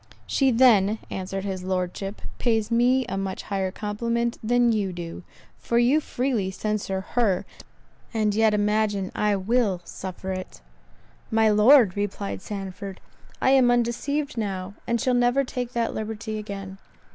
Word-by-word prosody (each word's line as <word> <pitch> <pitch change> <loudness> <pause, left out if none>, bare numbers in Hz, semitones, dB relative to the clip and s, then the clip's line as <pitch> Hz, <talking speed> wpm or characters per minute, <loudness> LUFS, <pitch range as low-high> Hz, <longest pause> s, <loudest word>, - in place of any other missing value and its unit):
"She 270 -2 +2
then," 225 -4 +5
answered 195 0 -4
his 190 -2 -3
Lordship, 185 +2 -3 0.2
"pays 225 -2 +1
me 250 +2 +3
a 195 +1 -3
much 190 -1 -4
higher 195 -2 -1
compliment 235 +4 -2
than 240 +1 +3
you 205 -4 0
do; 170 -1 -7 0.4
for 235 - -1
you 245 +6 +4
freely 245 -9 -1
censure 195 -1 -2
her, 215 -7 +1 0.7
and 215 -3 +1
yet 220 0 +3
imagine 205 -2 +1
I 210 -1 +1
will 200 -1 +1
suffer 190 0 -6
it." 185 - -6 0.7
"My 220 0 +3
Lord," 215 -1 +6
replied 205 -1 -3
Sandford, 195 -1 -6 0.4
"I 260 - +3
am 260 -2 +5
undeceived 245 +4 0
now, 195 -2 -3
and 235 0 +1
shall 255 0 +1
never 245 +2 +3
take 250 -1 -4
that 235 -1 0
liberty 215 0 -4
again." 195 -2 -7
215 Hz, 145 wpm, -25 LUFS, 195-240 Hz, 0.7 s, Lord